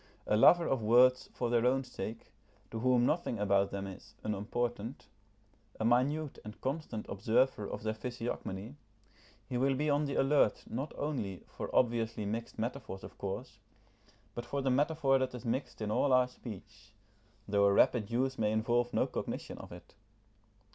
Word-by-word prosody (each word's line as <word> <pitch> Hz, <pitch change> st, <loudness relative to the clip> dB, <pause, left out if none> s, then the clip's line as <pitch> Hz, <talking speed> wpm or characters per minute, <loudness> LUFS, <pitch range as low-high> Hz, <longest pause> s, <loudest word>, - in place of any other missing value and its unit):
A 105 Hz, -, +2 dB
lover 170 Hz, +10 st, +7 dB
of 135 Hz, -3 st, 0 dB
words 125 Hz, +4 st, +5 dB
for 120 Hz, -2 st, -2 dB
their 120 Hz, -1 st, +3 dB
own 130 Hz, +2 st, +3 dB
sake, 115 Hz, -3 st, -7 dB, 0.4 s
to 115 Hz, -, -4 dB
whom 125 Hz, 0 st, +3 dB
nothing 155 Hz, -5 st, 0 dB
about 100 Hz, -1 st, +2 dB
them 100 Hz, 0 st, -4 dB
is 100 Hz, +2 st, -10 dB
unimportant, 115 Hz, +3 st, -3 dB, 0.7 s
a 110 Hz, -, 0 dB
minute 135 Hz, +5 st, +1 dB
and 105 Hz, 0 st, -9 dB
constant 135 Hz, -5 st, -3 dB
observer 105 Hz, +2 st, +1 dB
of -, -, -6 dB
their 110 Hz, 0 st, 0 dB
physiognomy, 115 Hz, 0 st, -5 dB, 0.7 s
he 125 Hz, -2 st, -2 dB
will 135 Hz, +1 st, +2 dB
be 150 Hz, +2 st, +1 dB
on 145 Hz, +1 st, +2 dB
the 140 Hz, -, -3 dB
alert 135 Hz, -5 st, +3 dB
not 135 Hz, +6 st, -4 dB
only 125 Hz, -11 st, -3 dB
for -, -, -7 dB
obviously 115 Hz, -3 st, +1 dB
mixed 115 Hz, +3 st, -4 dB
metaphors 115 Hz, -4 st, -4 dB
of -, -, -11 dB
course, 95 Hz, -1 st, -5 dB, 0.7 s
but 120 Hz, -, -5 dB
for 140 Hz, +3 st, -3 dB
the 135 Hz, -, +2 dB
metaphor 140 Hz, 0 st, +3 dB
that 130 Hz, -1 st, -1 dB
is 125 Hz, -, -8 dB
mixed 120 Hz, 0 st, -2 dB
in 105 Hz, -, -2 dB
all 135 Hz, +5 st, +2 dB
our 125 Hz, -1 st, +5 dB
speech, 105 Hz, -4 st, -11 dB, 0.5 s
though 100 Hz, 0 st, +3 dB
a 100 Hz, -, +5 dB
rapid 110 Hz, 0 st, +3 dB
use 130 Hz, +3 st, 0 dB
may 105 Hz, -1 st, +2 dB
involve 120 Hz, +2 st, +1 dB
no -, -, +3 dB
cognition -, -, -5 dB
of -, -, -10 dB
it. 85 Hz, 0 st, -12 dB
120 Hz, 170 wpm, -32 LUFS, 105-130 Hz, 0.7 s, lover